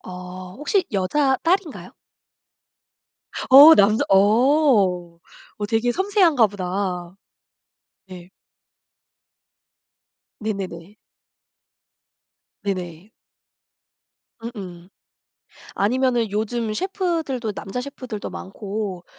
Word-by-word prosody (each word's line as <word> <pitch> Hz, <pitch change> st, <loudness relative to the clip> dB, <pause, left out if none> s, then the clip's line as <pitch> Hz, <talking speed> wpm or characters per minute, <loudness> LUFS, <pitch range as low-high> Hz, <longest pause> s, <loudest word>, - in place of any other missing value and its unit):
어 180 Hz, 0 st, -9 dB
혹시 365 Hz, +7 st, 0 dB
여자 265 Hz, +8 st, +1 dB
딸인가요? 350 Hz, -2 st, -1 dB, 1.6 s
어 290 Hz, +5 st, +10 dB
남자 210 Hz, +2 st, +3 dB
어 205 Hz, -, +3 dB, 0.4 s
어 205 Hz, -, -3 dB
되게 230 Hz, +3 st, 0 dB
섬세한가 370 Hz, -, +3 dB
보다. 185 Hz, -2 st, -4 dB, 0.9 s
네. 180 Hz, -1 st, -12 dB, 2.1 s
네네네. 195 Hz, -3 st, -6 dB, 1.7 s
네네. 185 Hz, 0 st, -5 dB, 1.3 s
음음. 190 Hz, -7 st, -9 dB, 0.9 s
아니면은 240 Hz, +1 st, 0 dB
요즘 220 Hz, +1 st, -2 dB
셰프들도 325 Hz, -, -2 dB
남자 200 Hz, +5 st, -6 dB
셰프들도 250 Hz, -5 st, -7 dB
많고 195 Hz, -2 st, -6 dB
215 Hz, 150 characters per minute, -22 LUFS, 185-265 Hz, 2.1 s, 어